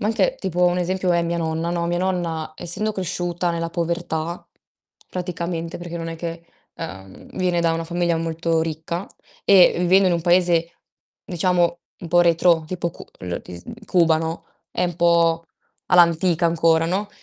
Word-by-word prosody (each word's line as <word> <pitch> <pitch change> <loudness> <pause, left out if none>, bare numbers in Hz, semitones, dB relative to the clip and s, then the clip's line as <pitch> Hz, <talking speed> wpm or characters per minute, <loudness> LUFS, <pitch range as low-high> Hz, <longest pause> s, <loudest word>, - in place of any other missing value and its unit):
Ma - - -1
anche - - +1
tipo 180 -1 0
un 180 0 +2
esempio 180 0 0
è 170 0 +2
mia 170 0 -1
nonna, 165 0 -2
no, 170 -1 -1
mia 175 0 0
nonna 170 -4 -2
essendo 210 +5 -2
cresciuta 175 -2 -2
nella 165 0 -3
povertà 170 -1 -3 0.6
praticamente 170 -2 -4
perché 175 -1 -7
non 165 0 -5
è 165 - -6
che, 170 0 -6 0.3
ehm, 95 -12 -10
viene 180 -2 +1
da 165 -1 +2
una 165 0 -2
famiglia 170 0 0
molto 165 0 -1
ricca 160 +3 -4 0.4
e 190 -3 +6
vivendo 185 +2 +4
in - - +1
un 170 - -1
paese 175 -1 +2 0.5
diciamo 175 -1 +1 0.2
un 170 - -7
po' 175 +1 +4
retrò 170 -1 +3
tipo 170 +1 -3
cu - - -12 0.2
lo 90 -1 -4
ti 90 - -10
s 85 - -12 0.2
Cuba, 165 -4 +4
no, 160 +1 -4 0.3
è 180 - 0
'n 175 -2 -5
po' 170 -1 +3 0.4
all'antica 170 -1 +4
ancora, 165 -1 +3
no, 195 +4 -1
170 Hz, 170 wpm, -22 LUFS, 165-180 Hz, 0.6 s, e